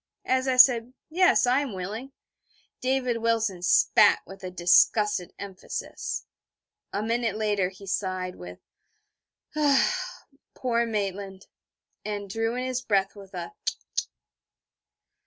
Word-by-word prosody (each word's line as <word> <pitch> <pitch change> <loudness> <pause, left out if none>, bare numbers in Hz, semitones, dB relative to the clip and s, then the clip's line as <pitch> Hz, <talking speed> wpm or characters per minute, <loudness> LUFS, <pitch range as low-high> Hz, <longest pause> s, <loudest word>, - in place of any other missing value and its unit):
As 260 +1 +1
I 260 -1 +1
said 250 -1 +6 0.2
'Yes, 370 0 +4
I 250 +2 +3
am 280 -6 -3
willing,' 210 +8 -6 0.7
David 255 -2 0
Wilson 225 -5 0
spat 180 - +5
with 195 0 -12
a 185 - -4
disgusted 180 +2 +3
emphasis. 195 -2 -6 0.7
A 205 - -2
minute 230 -1 0
later 205 -4 0
he 190 +1 -14
sighed, 185 -1 -2
with 90 0 -10 1.0
'Ah, 290 -3 +1 0.3
poor 235 -2 0
Maitland...' 200 -2 -4 0.6
and 205 -2 -5
drew 225 +2 -1
in 250 +1 -2
his 255 -1 -2
breath 195 -4 0
with 195 -1 -12
a 175 -1 -6
_tut! - - -3
215 Hz, 120 wpm, -26 LUFS, 190-250 Hz, 1.0 s, said